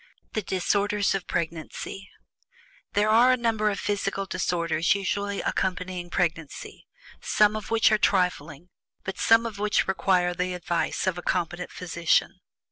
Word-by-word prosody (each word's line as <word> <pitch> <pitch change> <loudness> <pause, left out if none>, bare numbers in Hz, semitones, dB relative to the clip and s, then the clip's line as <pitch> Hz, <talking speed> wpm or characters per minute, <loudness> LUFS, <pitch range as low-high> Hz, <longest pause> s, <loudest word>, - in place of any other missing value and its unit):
THE 215 - 0
DISORDERS 200 +2 0
OF 195 -2 -3
PREGNANCY. 170 +3 -4 0.8
There 210 +1 +2
are 240 +3 +6
a 255 - +3
number 225 -3 +1
of 200 - -3
physical 195 -1 -2
disorders 170 -2 0
usually 200 +1 -2
accompanying 185 -1 -2
pregnancy, 165 -4 -3 0.3
some 210 0 +3
of 215 - -5
which 225 -1 +4
are 215 - +3
trifling, 175 -4 0 0.3
but 190 -1 -5
some 225 +1 +5
of 220 -3 -5
which 210 0 +1
require 185 -2 +2
the 180 0 -2
advice 175 0 -1
of 185 -2 -1
a - - -6
competent 175 0 -2
physician. 170 -2 0
190 Hz, 140 wpm, -26 LUFS, 175-205 Hz, 0.8 s, are